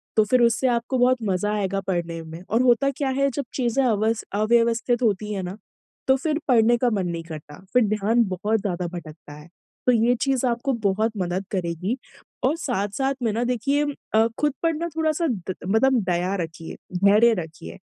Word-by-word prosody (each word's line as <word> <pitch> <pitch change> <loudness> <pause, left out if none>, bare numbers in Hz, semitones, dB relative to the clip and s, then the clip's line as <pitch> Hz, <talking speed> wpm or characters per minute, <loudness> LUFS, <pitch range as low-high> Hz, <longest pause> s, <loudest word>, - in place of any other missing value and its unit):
तो 215 - +5
फिर 250 +4 +3
उससे 235 +2 +3
आपको 240 +1 0
बहुत 250 +1 +4
मज़ा 205 +1 0
आएगा 195 -2 -1
पढ़ने 170 -2 -2
में। 160 +1 -9
और 230 +4 +2
होता 255 +2 +4
क्या 275 0 -2
है 275 - +3
जब 280 -3 -2
चीज़ें 255 +1 +1
अवस 220 0 +1
अव्यवस्थित 235 +2 +2
होती 210 -1 0
है 195 - -2
ना 180 +3 -6 0.5
तो 265 - +5
फिर 300 +3 -1
पढ़ने 240 -1 +4
का 245 +1 +2
मन 195 -4 0
नहीं 170 -1 -4
करता। 155 -2 -10
फिर 250 -2 +5
ध्यान 215 +3 +2
बहुत 205 +4 0
ज़्यादा 180 -3 -2
भटकता 160 -4 -9
है। 150 +2 -12 0.4
तो - - +7
ये 235 +1 +3
चीज़ 270 -2 +1
आपको 240 +3 0
बहुत 215 +3 +2
मदद 185 +1 -2
करेगी। 185 +5 -2 0.5
और 285 - +2
साथ-साथ 265 - -1
में 225 - +2
ना 235 - 0
देखिए 265 +4 +1 0.3
अ, 220 +1 +5
खुद 295 -2 +1
पढ़ना 330 0 0
थोड़ा-सा 315 +1 +1 0.2
ग - - 0
मतलब 240 +5 +3
दया 180 +3 0
रखिए, 165 0 -8 0.3
धैर्य 215 +4 +6
रखिए। 85 - -11
220 Hz, 185 wpm, -24 LUFS, 185-250 Hz, 0.5 s, तो